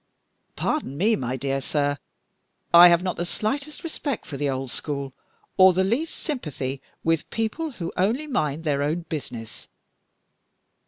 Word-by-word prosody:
"Pardon 135 +2 -1
me, 215 +7 +3
my 130 -1 -2
dear 135 0 -1
sir, 145 0 0 0.7
I 175 +1 +11
have 170 0 +4
not 185 -1 -2
the 175 - -1
slightest 280 - -3
respect 295 -6 -3
for 145 - -7
the 145 +1 -1
old 130 -1 -3
school, 140 -3 -3 0.4
or 185 0 +8
the 190 +2 +2
least 245 +12 0
sympathy 140 - -4 0.2
with 165 -1 +1
people 245 +8 -2
who 170 -7 -5
only 225 +11 +1
mind 160 - -1
their 145 -3 +1
own 155 +4 0
business. 120 -7 -6
165 Hz, 150 wpm, -25 LUFS, 140-220 Hz, 0.7 s, I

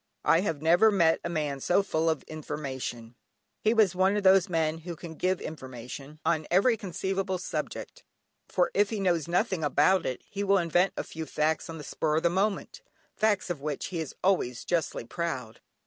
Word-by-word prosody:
I 165 - +5
have 165 -6 -2
never 175 +7 +6
met 170 -6 +3
a - - -2
man 150 -4 -2
so 180 +8 +2
full 165 -4 0
of 160 - -1
information. 135 -6 -6 0.5
He 215 - +2
was 215 -5 +4
one 190 +2 +2
of 205 - -1
those 190 -1 +5
men 160 -2 0
who 170 +1 -7
can 165 0 -9
give 185 +3 0
information 130 0 -8
on 160 -2 +1
every 200 +7 +4
conceivable 190 -2 -2
subject, - - -5 0.5
for 180 - +1
if 205 0 +3
he 220 - -3
knows 175 -5 +1
nothing 180 -1 0
about 150 +6 +3
it, 130 - -4
he 200 0 -4
will 200 0 +4
invent 175 +1 +2
a - - -1
few 160 -1 -7
facts 155 +2 0
on 165 - -6
the 150 - -8
spur 155 +1 -1
of 160 - 0
the 170 - +3
moment, 195 +2 -1 0.3
facts 205 -4 +1
of 155 -6 -5
which 150 -1 -3
he 170 - -1
is 160 -4 -5
always 175 -11 +1
justly 170 -8 -1
proud. 130 -7 -4
170 Hz, 195 wpm, -28 LUFS, 155-190 Hz, 0.5 s, never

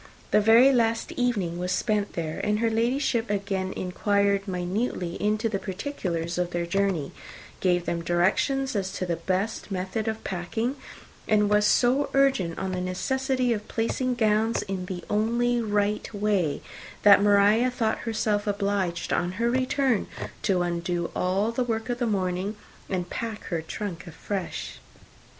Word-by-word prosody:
The 210 - +5
very 230 +6 +7
last 230 -2 +1
evening 200 -9 -1
was 180 0 -2
spent 210 +1 0
there; 160 -2 -3
and 210 0 +1
her 225 +1 +1
Ladyship 235 0 +1
again 195 -2 -1
inquired 200 +2 0
minutely 180 0 -2
into 215 +2 +1
the 205 -3 -2
particulars 180 - -3
of 180 -1 0
their 175 -1 -2
journey, 185 -4 0 0.5
gave 175 -2 +1
them 170 -1 -1
directions 220 +10 +1
as 190 -2 -1
to 185 - -3
the 170 -2 -1
best 190 +7 -2
method 190 +3 -3
of 220 0 -3
packing, 220 +8 -2 0.5
and 210 -1 +3
was 210 0 +4
so 260 +6 +3
urgent 265 -12 +2
on 190 - -2
the 180 -1 -2
necessity 255 +7 0
of 210 -1 -5
placing 250 +2 -1
gowns 220 -1 +2
in 190 -3 -4
the 180 -1 -5
only 235 +3 +1
right 210 -1 0
way, 205 -7 0 0.4
that 200 -1 +8
Maria 205 +4 +5
thought 235 -3 -1
herself 215 -2 -1
obliged, 200 -4 -1
on 175 +1 0
her 235 +4 0
return, 260 -2 +1 0.3
to 185 -4 +2
undo 170 0 -2
all 195 +5 +1
the 250 +2 0
work 225 -1 -2
of 240 0 -2
the 240 - +1
morning, 190 0 -1 0.3
and 180 -2 -2
pack 225 -2 -4
her 170 -3 -1
trunk 180 +1 -6
afresh. 180 +3 -5
205 Hz, 155 wpm, -26 LUFS, 185-230 Hz, 0.5 s, that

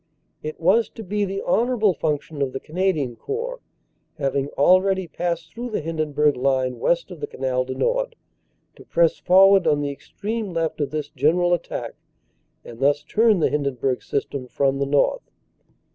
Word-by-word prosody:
It 155 0 -6
was 195 +7 +3
to 225 - -9
be 205 +1 -1
the 195 0 -4
honorable 230 -4 +2
function 150 -1 -3
of 135 -2 -1
the 135 - -3
Canadian 155 -7 -1
Corps, 485 - -4 0.6
having 135 0 -1
already 185 +4 +4
passed 170 -1 -3
through 245 +1 -5
the 215 - -2
Hindenburg 150 -2 0
line 130 -1 0
west 170 +8 0
of 175 - -9
the - - -4
Canal 130 -1 -1
du 130 0 -5
Nord, - - 0 0.6
to - - -13
press 170 -1 +2
forward 190 0 +6
on 150 -2 +3
the 145 -1 -2
extreme 210 +7 -5
left 165 -2 -1
of 145 - 0
this 150 -1 -4
general 165 +6 +2
attack 175 - -3 0.7
and 115 -1 -11
thus 145 +2 +2
turn 215 +3 +3
the - - +3
Hindenburg 135 -3 -1
System 140 -2 -3
from 135 +2 0
the 140 - 0
north. 140 0 +1
160 Hz, 165 wpm, -23 LUFS, 140-195 Hz, 0.7 s, forward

